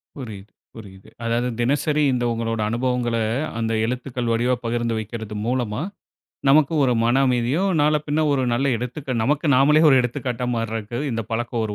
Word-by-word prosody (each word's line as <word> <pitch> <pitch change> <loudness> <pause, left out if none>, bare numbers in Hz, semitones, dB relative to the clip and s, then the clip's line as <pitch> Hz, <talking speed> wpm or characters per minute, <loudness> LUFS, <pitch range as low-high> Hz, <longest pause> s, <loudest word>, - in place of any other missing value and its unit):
புரியுது, 105 -7 -9 0.2
புரியுது. 95 -4 -12 0.2
அதாவது 120 +2 0
தினசரி 145 +4 +1
இந்த 120 -1 -1
உங்களோட 115 -1 -2
அனுபவங்கள 120 0 -1 0.4
அந்த 115 0 -1
எழுத்துக்கள் 125 -1 -3
வடிவா 120 +2 +1
பகிர்ந்து 115 -1 -1
வைக்கிறது 110 0 -6
மூலமா, 120 -1 -1 0.7
நமக்கு 155 +2 +4
ஒரு 125 - +2
மன 120 +2 +3
அமைதியும், 130 +10 +1
நாள 150 +1 +3
பின்ன 150 +2 0
ஒரு 130 -2 +1
நல்ல 135 +4 0
எடுத்துக்கு 130 +3 -5
நமக்கு 150 +5 +1
நாமலே 150 +4 +5
ஒரு 135 - +6
எடுத்துக்காட்டா 125 0 -3
மாறுவதற்கு 115 0 -3
இந்த 115 -1 -2
பழக்கம் 120 0 -2
ஒரு 105 - -5
120 Hz, 155 wpm, -22 LUFS, 115-135 Hz, 0.7 s, ஒரு